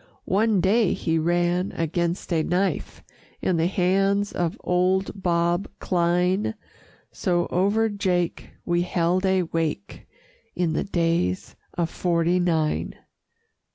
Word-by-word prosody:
One 205 0 +2
day 205 +2 +3
he 165 -1 0
ran 175 +3 +1
against 170 +2 -2
a 160 - +2
knife 180 +4 -1 0.4
In 180 - 0
the 165 +1 +2
hands 195 +2 +1
of 170 -2 -2
old 190 +2 0
Bob 175 +1 +1
Cline 180 +4 +1 0.6
So 175 -2 0
over 205 +5 +2
Jake 185 -5 -1 0.2
we 175 0 +1
held 180 +2 +1
a 190 -1 +2
wake, 165 +3 -4 0.5
In 175 -3 0
the - - -1
Days 165 - -1 0.2
of 170 -2 0
'Forty 175 0 +1
Nine. 160 -4 0
175 Hz, 120 wpm, -24 LUFS, 170-190 Hz, 0.6 s, day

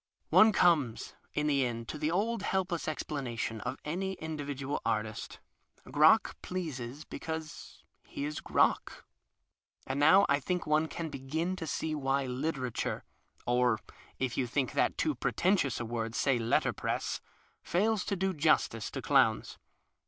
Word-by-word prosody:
One 220 0 +8
comes 155 - +2 0.2
in 150 - +1
the 140 -3 +3
end 115 -2 -3
to 155 - -5
the 150 - 0
old 220 +7 0
helpless 185 -3 -1
explanation 125 -7 -3
of - - -4
any 190 +5 -2
individual 145 -4 -4
artist. 110 0 -2 0.5
Crock - - +4
pleases 150 -6 -5
because 160 -1 -7 0.2
he 140 - -4
is 150 +1 -4
Crock. - - +1 0.8
And 140 - -2
now 170 +7 +7
I 140 0 +3
think 180 +5 -2
one 155 +1 +2
can 165 0 -5
begin 155 +7 -2
to 165 -3 -6
see 155 +1 -2
why 135 -2 0
litera 130 0 -2
ture - - -3 0.4
(or 120 -1 +3 0.4
if 130 -2 -2
you 125 - +1
think 130 +1 0
that - - +1
too - - +1
pretentious 175 - +1
a 120 - -3
word, 115 -1 -3
say 135 -4 +2
letterpress) 115 +1 0 0.4
fails 210 +3 +1
to 200 - -1
do 190 0 0
justice 150 -8 +2
to - - -6
clowns. - - +2
150 Hz, 145 wpm, -31 LUFS, 125-170 Hz, 0.8 s, One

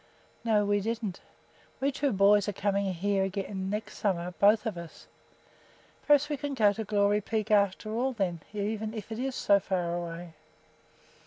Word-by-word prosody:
"No, 215 -3 +2
we 205 0 +2
didn't." 220 -2 -3 0.6
"We 275 +1 +1
two 280 0 0
boys 200 +1 +4
are - - -3
coming 200 0 0
here 195 +2 0
again 190 0 -3
next 210 +2 -4
summer, 180 -3 -1
both 210 +3 +5
of 220 -4 -2
us." 170 -1 -10 1.0
"Perhaps 295 0 +5
we 295 -1 -2
can 285 +1 -4
go 210 -4 +4
to 220 - -4
Glory 205 0 +2
Peak 220 +1 -2
after 200 0 +2
all 250 +4 0
then, 185 -7 -1
even 215 +1 -3
if 215 0 -7
it 220 - -4
is 265 0 -2
so 200 -1 +4
far 180 -3 -1
away." 170 -1 -6
205 Hz, 170 wpm, -29 LUFS, 190-220 Hz, 1.0 s, both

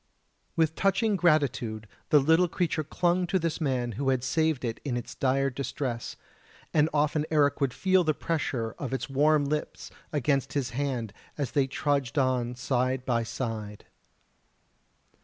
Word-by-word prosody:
With 160 -1 +2
touching 200 +4 +2
gratitude 130 - +1 0.2
the 150 - +6
little 160 +5 +4
creature 170 -2 -1
clung 175 +4 +1
to 190 - +1
this 165 -1 -2
man 130 -5 0
who 135 +5 -1
had 130 -2 +1
saved 155 -1 +1
it 115 -1 -3
in 125 -4 -2
its 120 - -6
dire 135 +1 +1
distress, 130 -2 -4 0.6
and 155 0 +4
often 150 0 +1
Eric 145 -2 +2
would 135 -2 +2
feel 185 +5 +2
the 155 -2 +1
pressure 140 -9 -2
of 135 -2 -4
its 135 +1 -3
warm 145 +2 +3
lips 150 +1 -3 0.2
against 140 -2 0
his 135 -4 -1
hand 125 -5 -2 0.2
as 140 -5 -2
they 140 -2 +2
trudged 140 -2 -1
on 125 -3 +1
side 130 +1 -1
by 120 -2 +1
side. 110 -3 -5
140 Hz, 155 wpm, -28 LUFS, 125-155 Hz, 0.6 s, the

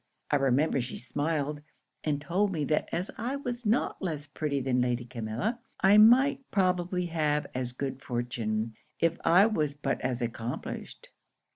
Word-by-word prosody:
I 145 - +5
remember 135 +1 +2
she 125 - -5
smiled, 145 +3 -2 0.4
and 150 -2 0
told 185 +7 0
me 155 -5 -1
that 150 +2 0
as 180 +3 -2
I 245 +5 -1
was 245 -4 -4
not 225 +5 +1
less 155 -6 -3
pretty 145 -1 -2
than 125 -1 +1
Lady 125 -1 0
Camilla, 120 - -3 0.2
I 200 +2 +6
might 260 +5 +6
probably 180 -1 +1
have 150 -3 0
as 125 -1 -2
good 135 +1 -4
fortune, 115 -3 -2 0.3
if 165 0 +1
I 180 +4 +6
was 155 -10 0
but 140 -2 -2
as 125 -1 -1
accomplished. 115 0 -5
150 Hz, 155 wpm, -29 LUFS, 125-185 Hz, 0.4 s, I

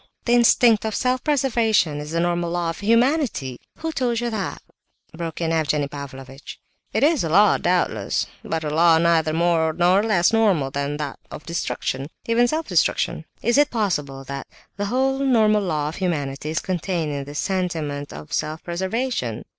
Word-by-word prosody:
The 240 - +2
instinct 235 -2 +5
of 220 -1 -2
self 255 0 0
preservation 230 - +2
is 150 0 -7
the 165 +1 -1
normal 175 0 0
law 170 -1 -1
of 165 - -9
humanity..." 230 - +1 0.2
"Who 325 0 -3
told 245 -6 0
you 240 0 -2
that?" 215 -3 -3 0.6
broke 165 -1 -5
in 165 -1 0
Evgenie 150 -3 0
Pavlovitch. 135 -1 -9 0.3
"It - - 0
is 305 - +3
a 165 - -2
law, 200 +5 +5
doubtless, 180 0 0 0.2
but 160 -1 -3
a 150 - -2
law 165 +1 +5
neither 165 -2 +3
more 165 -1 +2
nor 180 +4 +3
less 210 -3 +2
normal 195 -12 +2
than 140 +1 -2
that 150 -2 -5
of - - -9
destruction, 140 -5 -3 0.2
even 235 +1 +3
self 315 +4 -2
destruction. - - +1 0.2
Is 240 +4 +3
it 290 0 +4
possible 150 - -2
that 140 +1 -6 0.3
the 205 - -2
whole 265 +5 0
normal 220 -6 +3
law 155 -6 -1
of 160 - -8
humanity 150 -6 -2
is 160 - -3
contained 175 -3 -2
in 140 -1 -4
this 145 +1 -7
sentiment 160 -7 -2
of 155 - -9
self 155 +1 -2
preservation?" 185 - -2
175 Hz, 175 wpm, -22 LUFS, 150-225 Hz, 0.6 s, instinct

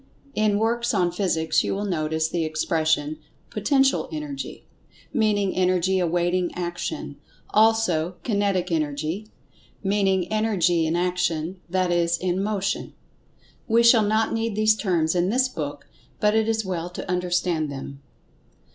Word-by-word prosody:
In 215 -1 +2
works 235 +2 0
on 180 -3 +2
Physics 160 -4 +1
you - - -1
will 205 +1 -2
notice 160 -3 0
the 165 0 -1
expression, 155 -1 0 0.3
"Potential 270 +5 +2
Energy," 300 -3 -6 0.5
meaning 210 -6 +1
Energy 185 0 +2
awaiting 175 +1 +1
action; 175 -5 -4 0.3
also 210 -6 +3
"Kinetic 200 -5 0
Energy," 155 +5 -2 0.6
meaning 195 -2 +1
Energy 190 -7 +2
in 160 - 0
Action; 175 -1 -1
that 185 0 +1
is, 170 0 +2
in 185 +1 -1
Motion. 200 -1 -2 0.7
We 230 +1 +4
shall 235 -1 +7
not 220 +1 +1
need 225 -1 -1
these 215 0 +4
terms 170 -6 +1
in 180 +1 +1
this 255 +4 +2
book, 145 - -6 0.3
but 210 0 +3
it 220 0 +2
is 220 -1 0
well 175 -2 -3
to 180 - -7
understand 180 -3 0
them. 140 0 -8
185 Hz, 135 wpm, -24 LUFS, 165-215 Hz, 0.7 s, shall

